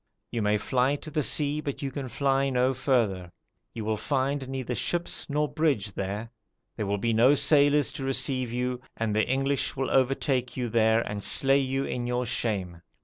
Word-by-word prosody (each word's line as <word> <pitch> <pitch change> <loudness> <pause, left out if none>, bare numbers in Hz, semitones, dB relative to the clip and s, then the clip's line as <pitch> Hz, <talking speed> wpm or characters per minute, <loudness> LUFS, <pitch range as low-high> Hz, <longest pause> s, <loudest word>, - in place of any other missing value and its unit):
You 115 - -2
may 105 0 +2
fly 130 +5 +1
to 155 +2 -9
the 155 - 0
sea, 150 +1 +1
but 145 0 -5
you 135 - -2
can 135 -1 -5
fly 135 +1 +1
no 130 0 +2
further; 115 -9 0 0.4
you 110 -2 -6
will 110 0 0
find 135 +3 -1
neither 130 -2 -3
ships 175 +7 -2
nor 150 +1 +1
bridge 145 -11 0
there; 100 +4 -4 0.4
there 105 -3 -3
will 100 +1 0
be 115 +3 0
no 125 +6 +5
sailors 145 -2 +4
to 135 - -7
receive 130 -2 0
you; 125 +1 -2 0.2
and 110 -2 -1
the 110 - +2
English 135 +1 0
will 135 -1 -2
overtake 130 -1 +1
you 125 -2 -2
there 110 0 +3
and 105 -3 -5
slay 135 0 +5
you 135 0 -1
in 120 -1 -3
your 125 0 -1
shame. 95 -8 -3
130 Hz, 190 wpm, -27 LUFS, 115-140 Hz, 0.4 s, no